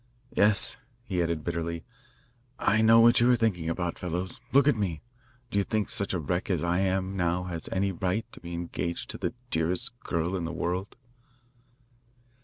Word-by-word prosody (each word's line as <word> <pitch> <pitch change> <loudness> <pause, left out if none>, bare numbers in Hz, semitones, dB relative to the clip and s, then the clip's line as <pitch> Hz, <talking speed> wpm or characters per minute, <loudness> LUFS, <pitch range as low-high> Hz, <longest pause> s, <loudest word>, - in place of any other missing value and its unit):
"Yes," 105 0 +3 0.3
he 95 -7 -1
added 85 -2 -1
bitterly, 85 -1 -3 0.7
"I 110 +1 +3
know 115 +1 +7
what 120 +1 +6
you 120 +1 +5
are 125 - +6
thinking 100 -9 0
about, 85 0 -2
fellows. 90 +1 -3
Look 140 +1 +5
at 145 - +5
me! 95 -7 -2 0.5
Do 100 - +2
you - - +2
think 110 0 -1
such 100 - 0
a - - 0
wreck 90 +6 -2
as 90 -5 +1
I 85 +1 +1
am 95 0 0
now 90 -1 +1
has 85 -3 -4
any 95 +1 +1
right 95 +4 -1
to - - -11
be 85 0 -6
engaged 85 0 -3
to - - -7
the 115 - -2 0.2
dearest 80 +2 0
girl 85 0 -1
in 90 - -2
the 85 - -3
world?" 90 +3 -3
90 Hz, 185 wpm, -28 LUFS, 85-100 Hz, 0.7 s, know